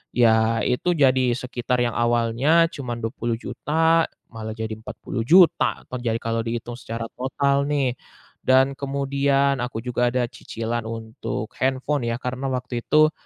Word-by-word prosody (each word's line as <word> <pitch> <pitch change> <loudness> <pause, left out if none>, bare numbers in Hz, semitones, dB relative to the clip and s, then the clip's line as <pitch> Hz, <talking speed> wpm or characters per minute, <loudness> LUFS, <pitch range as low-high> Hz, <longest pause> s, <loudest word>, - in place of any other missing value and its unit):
ya 115 -2 +3
itu 175 +8 +1
jadi 130 -4 +3
sekitar 125 -1 -1
yang 120 - 0
awalnya 120 +8 +2
cuma 125 -4 -5
Rp20.000.000 145 +8 0 0.2
malah 110 -1 -6
jadi 110 -1 -4
Rp40.000.000. 165 +10 +2
Atau 125 - -6
jadi 115 -2 -1
kalau 115 0 -2
dihitung 120 +1 -4
secara 115 -1 -6
total 140 +2 0
nih. 140 -4 +1 0.5
Dan 130 +1 +4
kemudian, 140 0 +1
aku 120 -2 -4
juga 125 0 0
ada 125 0 +1
cicilan 115 0 -4
untuk 110 -1 -5
handphone 130 0 0
ya, 115 - 0
karena 130 +2 -4
waktu 125 -2 -3
itu 155 +1 +5
125 Hz, 135 wpm, -23 LUFS, 115-140 Hz, 0.5 s, itu